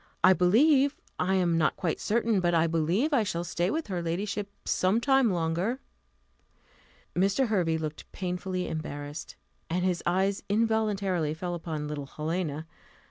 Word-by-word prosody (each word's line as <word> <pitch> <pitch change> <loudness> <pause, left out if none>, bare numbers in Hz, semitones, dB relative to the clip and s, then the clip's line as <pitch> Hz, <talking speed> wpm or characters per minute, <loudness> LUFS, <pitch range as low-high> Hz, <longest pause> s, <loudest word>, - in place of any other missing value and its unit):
"I 185 - +8
believe 270 - +4 0.2
I 190 +1 +2
am 175 -3 +2
not 155 - +2
quite 170 -4 -2
certain 225 -1 +1
but 175 -1 +2
I 165 0 +4
believe 170 - +1
I 265 - +4
shall 190 -5 -2
stay 175 +1 -1
with 320 +8 -1
her 185 -4 -3
ladyship 200 +4 -2 0.2
some 190 +5 +2
time 270 -1 +3
longer." 175 +8 -1 1.4
Mr. 200 +7 +2
Hervey 175 -6 +1
looked 155 -1 -6
painfully 180 0 -3
embarrassed, 145 -1 -6 0.3
and 180 +2 0
his 180 -2 0
eyes 190 +3 +1
involuntarily 205 -7 +1
fell 175 +2 -4
upon 160 -3 -4
little 145 -2 -5
Helena. 155 0 -3
180 Hz, 145 wpm, -28 LUFS, 165-210 Hz, 1.4 s, I